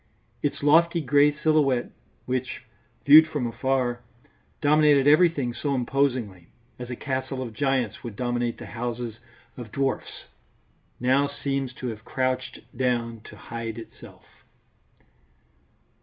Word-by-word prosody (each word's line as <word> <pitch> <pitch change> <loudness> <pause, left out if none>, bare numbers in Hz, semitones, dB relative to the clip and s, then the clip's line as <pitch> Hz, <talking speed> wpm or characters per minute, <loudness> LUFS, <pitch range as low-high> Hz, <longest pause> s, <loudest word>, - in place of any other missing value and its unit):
Its 145 - -2
lofty 170 +3 +4
grey 145 0 +4
silhouette, 145 -4 +1 0.3
which, 130 0 -3 0.4
viewed 155 +2 +9
from 150 -5 -3
afar, 120 +1 -1 0.6
dominated 150 -2 +4
everything 150 -5 +4
so 140 +3 -2
imposingly, 125 -8 -1 0.3
as 125 -1 -7
a 125 - -4
castle 130 +1 -3
of 115 -3 -7
giants 135 -4 -1
would 115 -4 -7
dominate 120 0 -2
the - - -9
houses 120 -1 -5 0.4
of 120 -4 -8
dwarfs, 135 -1 -3 0.8
now 130 +3 +2
seems 140 -2 -3
to 130 - -9
have 110 -1 -8
crouched 130 +1 -2
down 120 -3 -1
to - - -13
hide 115 -1 -6
itself. 115 - -12
130 Hz, 120 wpm, -25 LUFS, 120-145 Hz, 0.8 s, viewed